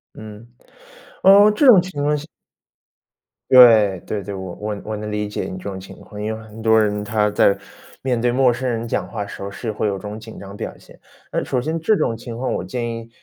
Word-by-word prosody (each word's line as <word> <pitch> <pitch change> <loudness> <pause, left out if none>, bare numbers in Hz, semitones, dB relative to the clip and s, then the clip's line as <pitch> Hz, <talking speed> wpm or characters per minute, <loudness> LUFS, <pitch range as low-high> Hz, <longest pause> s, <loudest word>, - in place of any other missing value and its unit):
嗯。 110 +1 -11 0.8
呃， 200 +2 +7
这 210 +8 +1
种 205 -8 +8
情 185 -5 -6
况 150 0 +1
下 145 - -8 1.2
对。 110 -7 +7
对 105 - -3
对， 100 - -6
我 95 -2 -6
我 105 -1 -5
我 110 -1 -4
能 105 0 -6
理 105 0 -2
解 105 - -4
你 95 - -6
这 90 - -11
种 95 -1 -5
情 95 - -12
况， 105 -1 -10
因 110 +1 -2
为 110 - -10
很 110 +1 -12
多 110 0 +4
人 105 -1 -1
他 105 0 +1
在 100 - +3 0.4
面 125 -3 -1
对 120 +1 +1
陌 130 0 +3
生 130 +2 -4
人 115 -1 -3
讲 - - -2
话 105 -3 -5
时 100 - -10
候， 100 - -4
是 110 +2 -5
会 105 0 -2
有 100 - -1
这 - - -11
种 105 +2 -7
紧 110 0 -11
张 100 0 -10
表 - - -6
现。 - - -19 0.3
那 - - -1
首 125 - -1
先 160 +4 -2
这 215 +7 +2
种 115 - 0
情 115 -1 -8
况， 130 - -2
我 - - -3
建 120 -2 -4
议， 115 0 -10
110 Hz, 255 characters per minute, -20 LUFS, 105-125 Hz, 1.2 s, 种